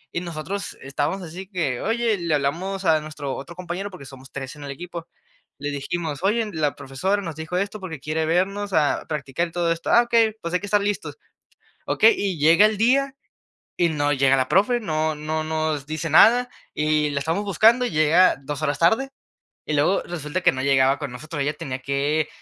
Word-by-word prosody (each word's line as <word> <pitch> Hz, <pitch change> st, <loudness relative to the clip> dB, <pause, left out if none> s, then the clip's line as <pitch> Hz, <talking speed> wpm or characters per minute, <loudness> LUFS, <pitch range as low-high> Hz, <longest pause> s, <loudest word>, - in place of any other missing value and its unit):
Y 170 Hz, -, 0 dB
nosotros 175 Hz, +3 st, -5 dB
estábamos 145 Hz, +7 st, -2 dB
así 185 Hz, +4 st, -8 dB
que: 170 Hz, -, -2 dB
"Oye, 225 Hz, 0 st, 0 dB
le 170 Hz, -3 st, 0 dB
hablamos 180 Hz, +8 st, -2 dB
a 160 Hz, -2 st, +4 dB
nuestro 150 Hz, -3 st, -6 dB
otro 170 Hz, +5 st, -8 dB
compañero, 185 Hz, +3 st, -5 dB
porque 180 Hz, -8 st, -11 dB
somos 135 Hz, -1 st, -13 dB
3 135 Hz, 0 st, -6 dB
en 145 Hz, -, -11 dB
el 140 Hz, -, -7 dB
equipo". 170 Hz, +3 st, -8 dB, 0.5 s
Le 145 Hz, 0 st, -4 dB
dijimos: 145 Hz, +1 st, -4 dB
"Oye, 220 Hz, +4 st, +2 dB
la 150 Hz, -3 st, 0 dB
profesora 190 Hz, +10 st, -2 dB
nos 165 Hz, -4 st, -5 dB
dijo 160 Hz, +3 st, -4 dB
esto, 200 Hz, +3 st, -2 dB
porque 170 Hz, -6 st, -7 dB
quiere 155 Hz, +3 st, -2 dB
vernos 195 Hz, +4 st, 0 dB
a 150 Hz, -3 st, +2 dB
practicar 150 Hz, +2 st, -2 dB
todo 170 Hz, 0 st, 0 dB
esto. 165 Hz, 0 st, -3 dB
Ah 235 Hz, -, +6 dB
okey, 230 Hz, -2 st, +2 dB
pues, 170 Hz, +1 st, -5 dB
hay 180 Hz, -, +2 dB
que 200 Hz, -, -7 dB
estar 205 Hz, 0 st, +2 dB
listos 205 Hz, -1 st, -3 dB, 0.7 s
¿okey?". 450 Hz, -, +5 dB
Y 190 Hz, -5 st, -2 dB
llega 165 Hz, +7 st, +6 dB
el 215 Hz, 0 st, +2 dB
día, 270 Hz, +5 st, +2 dB, 0.6 s
y 175 Hz, -1 st, +2 dB
no 145 Hz, -2 st, 0 dB
llega 135 Hz, -1 st, +3 dB
la 130 Hz, -1 st, 0 dB
profe 225 Hz, +6 st, +3 dB
no 155 Hz, -6 st, -1 dB
no 155 Hz, +1 st, -3 dB
nos 155 Hz, -2 st, -2 dB
dice 155 Hz, +1 st, -4 dB
nada 240 Hz, +10 st, +6 dB, 0.3 s
y 150 Hz, 0 st, +1 dB
la 140 Hz, -1 st, -2 dB
estamos 165 Hz, +8 st, -1 dB
buscando, 220 Hz, +6 st, +4 dB
y 245 Hz, -, -1 dB
llega 155 Hz, +4 st, +4 dB
2 145 Hz, +1 st, -5 dB
horas 145 Hz, -2 st, 0 dB
tarde, 225 Hz, +11 st, +3 dB, 0.6 s
y 155 Hz, -, -3 dB
luego 150 Hz, +7 st, +2 dB
resulta 170 Hz, +1 st, -4 dB
que -, -, +5 dB
no 130 Hz, 0 st, -4 dB
llegaba 135 Hz, 0 st, +3 dB
con 150 Hz, -4 st, -5 dB
nosotros. 150 Hz, +4 st, -5 dB
Ella 145 Hz, +2 st, -1 dB
tenía 130 Hz, -3 st, -5 dB
que 140 Hz, +3 st, 0 dB
160 Hz, 200 wpm, -23 LUFS, 145-195 Hz, 0.7 s, Ah